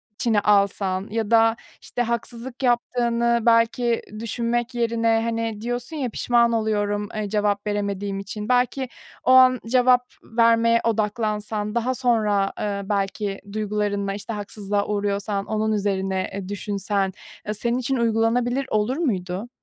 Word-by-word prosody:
içine 220 Hz, -1 st, +2 dB
alsan 200 Hz, -1 st, +1 dB
ya 225 Hz, -1 st, -2 dB
da, 225 Hz, 0 st, +5 dB, 0.3 s
işte, 245 Hz, -, -4 dB
haksızlık 235 Hz, +2 st, -4 dB
yaptığını 235 Hz, -1 st, +1 dB
belki 230 Hz, 0 st, +3 dB, 0.2 s
düşünmek 235 Hz, +2 st, -2 dB
yerine, 230 Hz, -1 st, +2 dB
hani, 230 Hz, -2 st, -2 dB
diyorsun 245 Hz, +6 st, -4 dB
ya, 260 Hz, -4 st, -1 dB
"Pişman 235 Hz, +1 st, +2 dB
oluyorum, 210 Hz, -2 st, 0 dB
eee, 210 Hz, -1 st, -2 dB
cevap 205 Hz, 0 st, 0 dB
veremediğim 200 Hz, -1 st, -2 dB
için." 210 Hz, +2 st, -6 dB
Belki 250 Hz, +1 st, +1 dB, 0.3 s
o -, -, +3 dB
an 255 Hz, -1 st, +7 dB
cevap 250 Hz, +1 st, +4 dB, 0.2 s
vermeye 230 Hz, 0 st, +3 dB
odaklansan, 215 Hz, -1 st, -1 dB
daha 245 Hz, +2 st, 0 dB
sonra, 215 Hz, -6 st, +1 dB
eee, 200 Hz, -1 st, -2 dB
belki 200 Hz, 0 st, -2 dB
duygularınla, 205 Hz, -2 st, -1 dB
işte, 210 Hz, +3 st, -6 dB
haksızlığa 205 Hz, -1 st, -3 dB
uğruyorsan 200 Hz, -1 st, -1 dB
onun 220 Hz, 0 st, -1 dB
üzerine, 195 Hz, -2 st, -1 dB
eee, 195 Hz, -1 st, -5 dB
düşünsen, 200 Hz, -1 st, -2 dB, 0.3 s
eee, 210 Hz, -, -1 dB
senin 235 Hz, +3 st, -1 dB
için 260 Hz, +2 st, -1 dB
uygulanabilir 235 Hz, +3 st, +1 dB
olur 215 Hz, +5 st, +1 dB
muydu? 195 Hz, -, -2 dB
220 Hz, 130 wpm, -23 LUFS, 205-235 Hz, 0.3 s, an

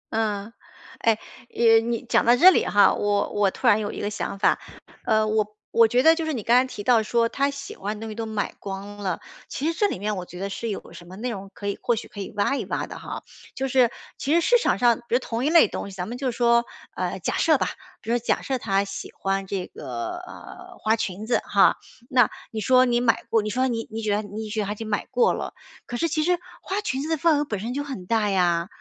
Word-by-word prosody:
嗯， 215 Hz, 0 st, -1 dB, 0.5 s
哎， 225 Hz, -2 st, +3 dB, 0.4 s
呃， 225 Hz, -1 st, +6 dB
你 235 Hz, 0 st, -3 dB
讲 -, -, +3 dB
到 240 Hz, +1 st, +5 dB
这 360 Hz, +8 st, +8 dB
里 -, -, +2 dB
哈， 205 Hz, -, +5 dB
我 205 Hz, -1 st, 0 dB
我 205 Hz, -2 st, +3 dB
突 -, -, -8 dB
然 210 Hz, -, +6 dB
有 210 Hz, -1 st, -3 dB
一 -, -, -7 dB
个 205 Hz, -, -2 dB
想 200 Hz, -1 st, -4 dB
法， -, -, +3 dB, 0.5 s
呃， 220 Hz, -1 st, +3 dB
我 215 Hz, -1 st, +1 dB, 0.2 s
我 230 Hz, -1 st, +6 dB
觉 245 Hz, +3 st, +2 dB
得 320 Hz, -, +8 dB
就 330 Hz, 0 st, -2 dB
是 315 Hz, -, -2 dB
你 230 Hz, -6 st, -4 dB
刚 235 Hz, -, +4 dB
才 255 Hz, -, +5 dB
提 210 Hz, -5 st, -7 dB
到 235 Hz, 0 st, +4 dB
说 230 Hz, +2 st, +1 dB
她 280 Hz, +1 st, +1 dB
喜 280 Hz, 0 st, -7 dB
欢 205 Hz, +2 st, -4 dB
的 -, -, -11 dB
东 225 Hz, -, -5 dB
西 -, -, -5 dB
都 225 Hz, 0 st, -4 dB
买 215 Hz, -2 st, -2 dB
光 200 Hz, +1 st, -7 dB
了， 190 Hz, -4 st, -2 dB, 0.3 s
其 280 Hz, -, -4 dB
实 330 Hz, +1 st, 0 dB
这 415 Hz, -, +3 dB
里 -, -, -3 dB
面 210 Hz, +2 st, -2 dB
我 185 Hz, -, -4 dB
觉 180 Hz, 0 st, -11 dB
得 200 Hz, +1 st, -3 dB
是 230 Hz, +4 st, -4 dB
有 205 Hz, -, -6 dB
什 175 Hz, -, -12 dB
么 185 Hz, -, -10 dB
内 240 Hz, +4 st, -3 dB
容 195 Hz, -2 st, -7 dB
可 205 Hz, -, -9 dB
以 200 Hz, -, -2 dB
或 240 Hz, -, +2 dB
许 225 Hz, -, -6 dB
可 205 Hz, -, -11 dB
以 195 Hz, -, -5 dB
挖 240 Hz, +7 st, +2 dB
一 -, -, -2 dB
挖 -, -, -2 dB
的 -, -, -9 dB
哈。 -, -, -7 dB, 0.3 s
就 270 Hz, 0 st, -1 dB
是 255 Hz, -2 st, +4 dB, 0.3 s
其 285 Hz, -, -2 dB
实 -, -, +6 dB
市 485 Hz, +7 st, +4 dB
场 -, -, +1 dB
上， 240 Hz, -2 st, +4 dB
比 240 Hz, -, +1 dB
如 -, -, +4 dB
同 235 Hz, -1 st, -3 dB
一 300 Hz, -, +3 dB
类 330 Hz, -9 st, +7 dB
东 200 Hz, -, -5 dB
西， 195 Hz, -, -11 dB
咱 180 Hz, -1 st, -4 dB
们 235 Hz, -, -5 dB
就 255 Hz, 0 st, -1 dB
说， 235 Hz, 0 st, +3 dB, 0.3 s
呃， -, -, -2 dB
假 -, -, -2 dB
设 -, -, +4 dB
吧 -, -, 0 dB, 0.3 s
比 225 Hz, -, -4 dB
如 240 Hz, -, +2 dB
假 240 Hz, -, 0 dB
设 265 Hz, -2 st, -2 dB
她 195 Hz, -3 st, +1 dB
喜 200 Hz, 0 st, -6 dB
欢 195 Hz, 0 st, -1 dB
这 190 Hz, -2 st, -3 dB
个， 120 Hz, -, -6 dB
呃， 370 Hz, +1 st, -11 dB
花 220 Hz, +1 st, +2 dB
裙 205 Hz, -2 st, -4 dB
子 235 Hz, -, +2 dB
哈， -, -, +4 dB, 0.3 s
那 245 Hz, -4 st, +4 dB, 0.2 s
你 220 Hz, -1 st, -4 dB
说 255 Hz, +3 st, +5 dB
你 240 Hz, -1 st, +1 dB
买 235 Hz, -2 st, +2 dB
过， 225 Hz, -1 st, +4 dB
你 210 Hz, -, -3 dB
说 255 Hz, +4 st, +1 dB
你 230 Hz, -2 st, -3 dB
你 225 Hz, 0 st, -5 dB
觉 210 Hz, -1 st, +1 dB
得 210 Hz, -, 0 dB
你 215 Hz, +1 st, -6 dB
觉 215 Hz, +1 st, -3 dB
得 205 Hz, -, -1 dB
她 205 Hz, -, -2 dB
已 -, -, -10 dB
经 220 Hz, +1 st, -7 dB
买 205 Hz, -, -2 dB
过 465 Hz, -1 st, +3 dB
了， -, -, -5 dB, 0.3 s
可 240 Hz, -, -4 dB
是 335 Hz, -, +1 dB
其 310 Hz, 0 st, 0 dB
实 355 Hz, +1 st, +2 dB, 0.2 s
花 390 Hz, +2 st, -2 dB
裙 270 Hz, -10 st, -2 dB
子 305 Hz, -, -4 dB
的 320 Hz, -, +1 dB
份 320 Hz, -1 st, +3 dB
额 295 Hz, -, 0 dB
本 210 Hz, -8 st, -3 dB
身 230 Hz, +5 st, -4 dB
就 285 Hz, -, -2 dB
很 265 Hz, -11 st, -7 dB
大 215 Hz, 0 st, +1 dB
呀， 175 Hz, -2 st, +2 dB
225 Hz, 290 characters per minute, -24 LUFS, 205-255 Hz, 0.5 s, 这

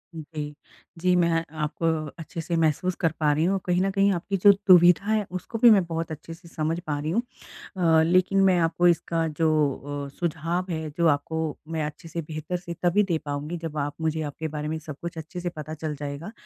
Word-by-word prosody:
Okay. 150 Hz, -1 st, -6 dB, 0.5 s
जी, 180 Hz, +1 st, +3 dB
मैं 170 Hz, -2 st, +2 dB, 0.2 s
आप 155 Hz, -, -7 dB, 0.4 s
अच्छे 165 Hz, +1 st, -6 dB
से 170 Hz, +1 st, -2 dB
महसूस 165 Hz, +3 st, +1 dB
कर 165 Hz, -, +4 dB
पा 150 Hz, -2 st, +3 dB
रही 155 Hz, +3 st, +2 dB
हूँ, 195 Hz, +1 st, +1 dB
कहीं 180 Hz, 0 st, +2 dB
न 195 Hz, -, +2 dB
कहीं 195 Hz, +1 st, +3 dB
आपकी 195 Hz, +3 st, -2 dB
जो 200 Hz, +2 st, +7 dB, 0.2 s
दुविधा 180 Hz, +1 st, +7 dB
है, 215 Hz, -1 st, +1 dB
उसको 185 Hz, +5 st, -5 dB
भी 240 Hz, +2 st, +7 dB
मैं 200 Hz, -3 st, +5 dB
बहुत 165 Hz, -1 st, -4 dB
अच्छे 160 Hz, +2 st, -7 dB
से 170 Hz, +1 st, -15 dB
समझ 165 Hz, 0 st, -2 dB
पा 155 Hz, -4 st, -3 dB
रही 155 Hz, +2 st, -2 dB
हूँ। 230 Hz, +7 st, +2 dB, 0.6 s
अ, 165 Hz, -3 st, +4 dB
लेकिन 185 Hz, +3 st, +3 dB
मैं 185 Hz, -2 st, +4 dB
आपको 165 Hz, +2 st, +2 dB
इसका 165 Hz, -1 st, +1 dB
जो 160 Hz, +1 st, 0 dB, 0.6 s
अ, -, -, -10 dB
सुझाव 170 Hz, +2 st, -1 dB
है, 160 Hz, -1 st, -3 dB
जो 170 Hz, -1 st, +3 dB
आपको 150 Hz, +2 st, 0 dB, 0.3 s
मैं 160 Hz, -1 st, -1 dB
अच्छे 150 Hz, +2 st, -8 dB
से, 165 Hz, +1 st, -4 dB
बेहतर 155 Hz, +3 st, -4 dB
से 175 Hz, -1 st, -7 dB
तभी 180 Hz, +4 st, +4 dB
दे 175 Hz, -5 st, 0 dB
पाऊँगी, 145 Hz, +4 st, -3 dB
जब 160 Hz, -2 st, -6 dB
आप 145 Hz, 0 st, -1 dB
मुझे 160 Hz, 0 st, 0 dB
आपके 160 Hz, +3 st, -5 dB
बारे 150 Hz, 0 st, -4 dB
में 160 Hz, +1 st, -2 dB
सब 155 Hz, -2 st, -8 dB
कुछ 170 Hz, -1 st, -6 dB
अच्छे 160 Hz, +3 st, -6 dB
से 175 Hz, 0 st, -2 dB
पता 155 Hz, -1 st, -7 dB
चल 155 Hz, -1 st, -4 dB
जाएगा, 145 Hz, +7 st, -6 dB
165 Hz, 220 wpm, -25 LUFS, 155-180 Hz, 0.6 s, जो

